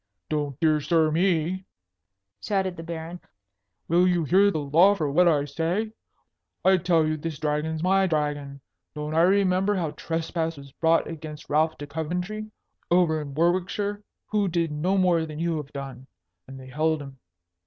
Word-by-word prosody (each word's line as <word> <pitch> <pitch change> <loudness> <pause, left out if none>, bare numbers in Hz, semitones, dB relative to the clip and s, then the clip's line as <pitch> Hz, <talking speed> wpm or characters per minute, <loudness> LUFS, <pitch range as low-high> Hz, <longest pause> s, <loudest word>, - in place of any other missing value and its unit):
"Don't 145 -3 -2
dear 155 -2 +3
sir 160 0 +2
me!" 175 +1 +1 0.8
shouted 190 -3 -1
the 165 - -8
Baron. 165 +1 -6 0.7
"Will 175 +2 +4
you 175 -2 +2
hear 190 +6 +4
the 195 - -2
law 160 +7 +4
for 155 -7 -1
what 175 +5 +4
I 145 -4 +3
say? 165 +9 -2 0.7
I 190 0 +6
tell 170 -3 +2
you 155 0 -1
this 155 0 -5
Dragon's 155 +2 -2
my 190 +1 +3
dragon. 145 -3 -2 0.3
Don't 150 +1 -4
I 165 - +4
remember 190 +2 +3
how 165 -5 -1
trespass 165 0 -3
was 140 -1 -12
brought 165 +3 +2
against 155 -2 -8
Ralph 155 +2 +2
de 145 - -6
Coventry, 180 +8 -4 0.4
over 170 -3 +3
in 140 -2 -8
Warwickshire? 185 +5 0 0.3
Who 210 -2 +2
did 170 -2 0
no 175 +6 0
more 175 -3 +2
than 155 -1 -8
you 165 0 -1
have 150 -2 -7
done. 135 -2 -8 0.4
And 135 0 -10
they 130 0 -11
held 155 +3 0
him. 135 -1 -12
165 Hz, 165 wpm, -25 LUFS, 150-180 Hz, 0.8 s, I